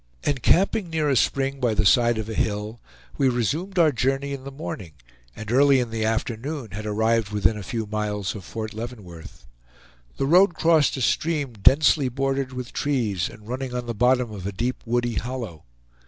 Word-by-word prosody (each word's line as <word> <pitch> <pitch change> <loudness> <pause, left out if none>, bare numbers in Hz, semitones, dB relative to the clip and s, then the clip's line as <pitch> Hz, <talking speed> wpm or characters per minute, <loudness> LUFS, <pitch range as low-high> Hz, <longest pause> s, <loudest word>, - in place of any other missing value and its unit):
Encamping 170 - +2
near 155 -2 0
a 135 - +2
spring 135 +2 +1
by 120 -4 +1
the 105 - +1
side 120 +2 +4
of 110 -1 -4
a 110 - -4
hill, 105 +2 -2 0.4
we 135 -2 +4
resumed 150 - -2
our 165 -3 +5
journey 135 +2 -1
in 135 -1 -7
the 140 - -6
morning, 105 - -7 0.4
and 110 0 -7
early 135 +1 +5
in 120 -2 -2
the 110 -1 -2
afternoon 115 +3 -3
had 105 +3 -6
arrived 110 0 +1
within 105 +1 +1
a 105 - -6
few 110 +3 -4
miles 105 -2 -2
of 105 - -8
Fort 110 +3 -6
Leavenworth. 100 - -9 0.7
The - - 0
road 175 +4 +5
crossed 160 -4 +3
a - - -4
stream 145 0 0
densely 135 +5 +4
bordered 135 +1 -1
with 125 -1 -7
trees, 115 - -1
and 105 0 -14
running 130 +1 -4
in 125 -1 -3
the 120 - -3
bottom 125 +1 +2
of 100 -3 -6
a - - -2
deep 120 +6 -3
woody 120 -1 0
hollow. 115 -10 -6
120 Hz, 185 wpm, -24 LUFS, 110-135 Hz, 0.7 s, our